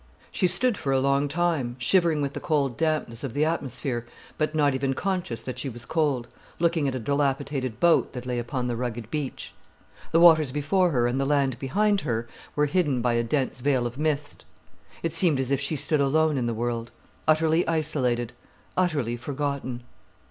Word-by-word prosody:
She 185 - +1
stood 210 +6 +2
for 135 - -1
a 135 - +3
long 140 +1 +2
time, 150 -6 0
shivering 160 +3 +2
with 140 0 -2
the - - -4
cold 140 -6 0
dampness 155 -7 -1
of 135 -5 -5
the 150 +2 +2
atmosphere, 130 -6 -3 0.3
but 155 0 -1
not 145 -2 +3
even 135 0 -1
conscious 180 - -2
that 130 - -5
she 140 - -2
was 120 -1 -7
cold, 145 -6 0 0.3
looking 165 -3 +1
at 130 - -1
a - - -2
dilapidated 135 -1 -1
boat 170 -1 +3
that 125 -1 -6
lay 125 -1 -2
upon 125 +1 -3
the 120 -1 -1
rugged 120 -2 -4
beach. 150 -3 -4 0.6
The 165 - +4
waters 160 -5 +6
before 155 +6 +2
her 125 -6 +1
and 125 +3 0
the - - +1
land 140 -3 +1
behind 205 +9 +1
her 115 -4 -2 0.3
were 150 - +3
hidden 145 -6 +1
by 120 -1 +2
a 120 0 +1
dense 130 +1 -1
veil 130 -1 +1
of 120 +3 -5
mist. 150 -2 -2 0.6
It 165 -1 -1
seemed 165 -4 +3
as 135 0 -1
if 140 0 +1
she 140 +3 0
stood 150 +1 +1
alone 155 +2 +2
in 125 -3 0
the 115 - -1
world, 120 0 -2 0.4
utterly 160 +2 +3
isolated, 135 -7 0 0.4
utterly 150 -10 0
forgotten. 140 -2 -3
140 Hz, 190 wpm, -26 LUFS, 125-155 Hz, 0.6 s, waters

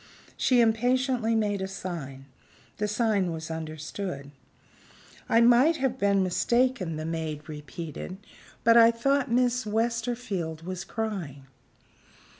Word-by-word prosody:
She 250 -2 +3
impatiently 240 +1 +2
made 205 -3 0
a 190 - -2
sign. 160 -9 -6 0.5
The 210 - -1
sign 210 -4 +1
was 160 0 -6
understood. 155 -1 -5 1.0
"I 230 - +5
might 245 +7 +5
have 265 -1 -1
been 200 -1 +3
mistaken," 235 0 +1
the 155 0 -4
maid 160 -2 -4
repeated 155 +4 -7 0.5
"but 230 0 +6
I 230 -1 +8
thought 270 +4 +1
Miss 245 +1 +2
Westerfield 220 -7 -2
was 185 0 -4
crying." 180 -12 -4
205 Hz, 115 wpm, -27 LUFS, 165-235 Hz, 1.0 s, I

